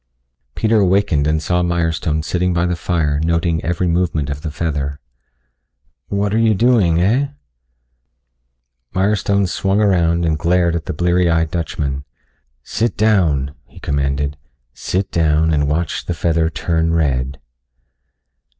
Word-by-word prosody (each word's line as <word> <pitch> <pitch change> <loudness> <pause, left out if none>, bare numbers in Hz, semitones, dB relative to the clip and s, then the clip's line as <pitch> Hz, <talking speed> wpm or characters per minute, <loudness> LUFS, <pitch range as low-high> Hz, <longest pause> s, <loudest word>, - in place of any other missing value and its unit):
Peter 110 0 +2
awakened 95 -6 +2
and 80 +1 0
saw 90 +2 +1
Mirestone 80 -3 -1
sitting 90 +2 -1
by 85 +1 +1
the 90 0 0
fire 80 -4 0
noting 85 0 0
every 85 +2 -1
movement 85 -4 0
of 70 +1 -5
the 80 - -4
feather. 75 -2 -3 1.1
"What 100 0 -1
are 110 - +2
you 110 -2 +3
doing, 105 -7 +3
heh?" 115 +11 +2 1.7
Mirestone 100 +1 +1
swung 95 +2 0
around 85 -5 +2
and 80 -2 0
glared 85 0 +2
at 85 - -3
the - - -2
bleary 90 +2 +2
eyed 80 -1 +1
Dutchman. 70 -5 -3 0.6
"Sit 115 +1 -2
down," 85 -11 +2
he - - -15
commanded. 70 +1 -1 0.4
"Sit 95 +1 -2
down 80 0 +2
and 75 -1 +1
watch 80 +2 -1
the 90 - -2
feather 80 -1 +1
turn 80 0 -1
red." 65 -4 0
85 Hz, 135 wpm, -18 LUFS, 75-90 Hz, 1.7 s, you